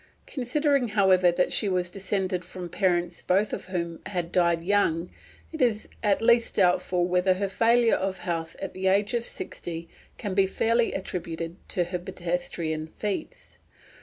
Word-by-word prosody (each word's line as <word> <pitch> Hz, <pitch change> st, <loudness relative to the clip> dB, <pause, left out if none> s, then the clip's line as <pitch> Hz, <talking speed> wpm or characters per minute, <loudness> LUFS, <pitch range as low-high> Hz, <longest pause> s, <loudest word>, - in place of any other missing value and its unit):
Considering, 280 Hz, 0 st, +1 dB
however, 190 Hz, -4 st, +4 dB
that 180 Hz, +1 st, +1 dB
she 205 Hz, -, +2 dB
was 180 Hz, -1 st, 0 dB
descended 190 Hz, -2 st, -2 dB
from 180 Hz, -1 st, -7 dB
parents 175 Hz, -1 st, 0 dB
both 195 Hz, +3 st, +1 dB
of -, -, -4 dB
whom 170 Hz, -3 st, -3 dB
had 175 Hz, -3 st, -3 dB
died 170 Hz, -2 st, +2 dB
young, 180 Hz, -3 st, +1 dB, 0.4 s
it 320 Hz, -, -5 dB
is 225 Hz, -4 st, +1 dB
at 205 Hz, 0 st, +2 dB
least 235 Hz, 0 st, +4 dB
doubtful 180 Hz, 0 st, +2 dB
whether 180 Hz, +1 st, +2 dB
her 200 Hz, +1 st, -1 dB
failure 230 Hz, +4 st, +3 dB
of 190 Hz, 0 st, -2 dB
health 165 Hz, -2 st, -4 dB
at 195 Hz, -, -5 dB
the 190 Hz, 0 st, -2 dB
age 200 Hz, +4 st, +2 dB
of 235 Hz, -1 st, 0 dB
sixty 165 Hz, -7 st, -5 dB, 0.3 s
can 205 Hz, -4 st, -4 dB
be 190 Hz, 0 st, +3 dB
fairly 230 Hz, +4 st, +1 dB
attributed 170 Hz, -3 st, -4 dB
to 180 Hz, -, +1 dB
her 175 Hz, +1 st, -4 dB
pedestrian 170 Hz, -3 st, -3 dB
feats. 205 Hz, -, -5 dB
185 Hz, 160 wpm, -26 LUFS, 175-205 Hz, 0.4 s, however